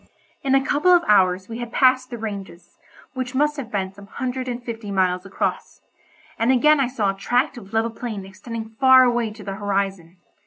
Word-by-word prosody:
In 270 -1 +2
a 270 0 +2
couple 295 +7 +2
of 350 -1 +6
hours 185 -2 +3
we 230 0 -7
had 240 -1 -6
passed 255 -1 +3
the 240 - -6
ranges, 200 -5 -8 0.3
which 255 -1 -4
must 295 +2 +2
have 260 -5 -6
been 190 -2 -2
some 200 0 -14
hundred 255 +2 -4
and 245 0 -4
fifty 225 -3 -6
miles 185 -1 0
across, 195 - -3 0.6
and 230 +3 +3
again 300 +4 +4
I 270 - +2
saw 220 -6 0
a - - -9
tract 245 +8 0
of 200 -5 -11
level 225 +1 0
plain 220 -4 -6
extending 220 +3 -7
far 260 -1 +7
away 240 -2 +1
to 210 0 -11
the 195 - -5
horizon. 195 -4 -2
230 Hz, 200 wpm, -22 LUFS, 195-255 Hz, 0.6 s, far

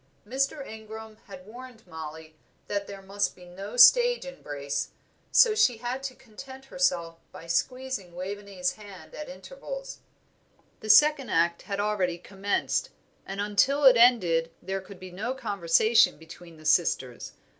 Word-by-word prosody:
Mr. 275 +4 -1
Ingram 220 -1 -10
had 185 -2 -11
warned 240 +1 -12
Mollie 160 0 -9 0.3
that 200 -1 -3
there 195 -1 -9
must 200 +1 -2
be 180 - -15
no 195 +6 -9
stage 485 - +7
embrace, 145 - -5 0.4
so 465 -3 +6
she 265 - +3
had 245 +3 -4
to 270 -2 -6
content 265 +4 -12
herself 170 -12 -1
by - - -11
squeezing 205 +1 -2
Waveney's 195 0 -4
hand 200 -6 -13
at 300 - -8
intervals. - - -8 0.8
The 215 - -9
second 290 +4 +6
act 170 +1 +1
had 200 -1 -5
already 200 -4 0
commenced, 200 - -2 0.4
and 195 +1 -6
until 210 +8 +2
it 260 -2 +8
had 240 +2 +8
ended 165 -7 -1
there 190 +1 -4
could 190 0 -13
be 185 -1 -10
no 215 +8 -4
conversation 215 -1 +3
between 165 +1 -13
the 155 - -16
sisters. 135 -6 0
205 Hz, 145 wpm, -27 LUFS, 180-255 Hz, 0.8 s, it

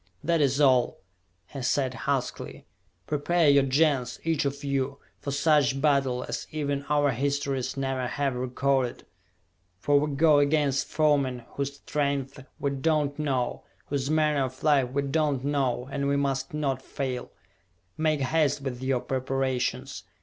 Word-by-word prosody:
"That 165 -1 +2
is 140 0 +2
all," 130 -4 +4 0.5
he 135 - -8
said 130 +1 0
huskily. 140 -1 -3 0.4
"Prepare 155 +3 +1
your 140 0 +6
Gens, 135 -3 +1
each 160 -3 0
of 140 +1 -3
you, 140 0 -1 0.2
for - - -5
such 140 -1 +2
battle 135 -4 +2
as - - -5
even 145 -2 -2
our 145 -1 +3
histories 140 +1 -1
never 135 -2 -1
have 140 +1 -1
recorded! 130 +1 -1 0.7
For 145 +9 +3
we 145 -1 -2
go 150 0 +5
against 145 -2 +2
foemen 140 -5 +1
whose 140 0 -4
strength 140 -2 -2 0.2
we 140 - 0
do 140 +3 0
not 150 -2 0
know, 135 -5 -1 0.3
whose 140 -1 -1
manner 150 -3 +2
of 130 +1 -9
life 140 -5 +3
we 140 +2 -1
do 140 +3 0
not 130 -2 -5
know, 135 -3 0
and 140 0 -1
we 140 0 +2
must 135 -1 -1
not 140 -4 -1
fail! 130 -2 -4 0.7
Make 155 -2 +1
haste 145 0 +1
with 130 -2 -5
your 130 -1 0
preparations! 130 -4 -2
140 Hz, 150 wpm, -27 LUFS, 130-145 Hz, 0.7 s, your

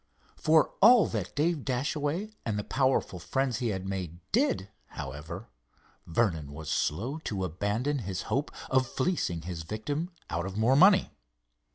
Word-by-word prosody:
For 155 -1 +3
all 235 +1 +8
that 95 -5 -4
Dave 155 -1 +1
Dashaway 145 - -1
and 110 -2 -1
the 105 - -2
powerful 130 -8 +1
friends 130 +5 -1
he 125 - 0
had 95 -3 -2
made 90 -3 -4
did, 245 - +1 0.2
however, 75 - -7 0.6
Vernon 80 -6 0
was 75 0 -6
slow 115 - -1
to 100 -11 -3
abandon 105 - -1
his 95 -5 -4
hope 135 +7 -1 0.2
of 130 -1 +3
fleecing 130 - -1
his 85 -1 -5
victim 110 - -3 0.2
out 85 +3 -2
of 95 +1 -6
more 115 +5 +4
money. 190 +5 +6
115 Hz, 150 wpm, -29 LUFS, 90-145 Hz, 0.6 s, all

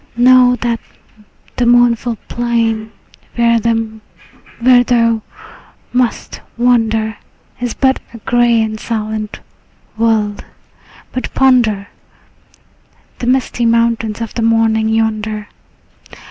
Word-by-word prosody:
Know 250 0 +5
that 235 -1 -1 0.8
the 245 - +1
mournful 240 -1 +3
plain 230 -2 -1 0.4
where 235 -1 +3
thou 230 +1 0 0.7
must 250 -2 -1 0.2
wander 225 -3 +1 0.4
Is 245 -2 -3
but 265 -1 +2
a 230 - -10
gray 235 0 +2
and 215 0 -4
silent 215 -2 -4 0.6
world, 220 -2 0 0.7
but 255 - -4
ponder 235 -7 +2 1.3
The 240 - -4
misty 255 -1 0
mountains 230 -1 0
of 230 - -5
the 235 - -3
morning 225 -1 +2
yonder. 215 -1 -1
230 Hz, 90 wpm, -15 LUFS, 220-240 Hz, 1.3 s, Know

